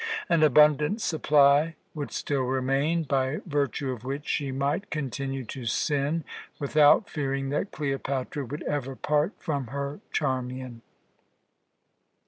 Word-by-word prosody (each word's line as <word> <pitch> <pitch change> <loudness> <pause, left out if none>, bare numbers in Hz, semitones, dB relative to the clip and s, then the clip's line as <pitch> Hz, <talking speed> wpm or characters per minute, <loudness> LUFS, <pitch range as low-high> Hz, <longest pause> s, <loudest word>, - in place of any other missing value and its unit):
An 170 -2 +3
abundant 150 - +5
supply 150 -3 +3 0.2
would 145 -3 -5
still 140 -2 -1
remain, 135 +6 +1
by 135 -1 0
virtue 140 -4 -1
of 120 -3 -7
which 140 +3 -4
she 140 -2 -1
might 140 +9 -1
continue 135 -3 -3
to 125 +2 -7
sin 145 +7 0 0.3
without 150 +7 +4
fearing 135 -4 -2
that 150 +8 -1
Cleopatra 135 -1 -3
would 145 +5 -6
ever 135 -2 -2
part 150 +7 +1
from 140 -7 -3
her 140 +3 -4
Charmian. 130 -3 -2
140 Hz, 120 wpm, -27 LUFS, 135-150 Hz, 0.3 s, abundant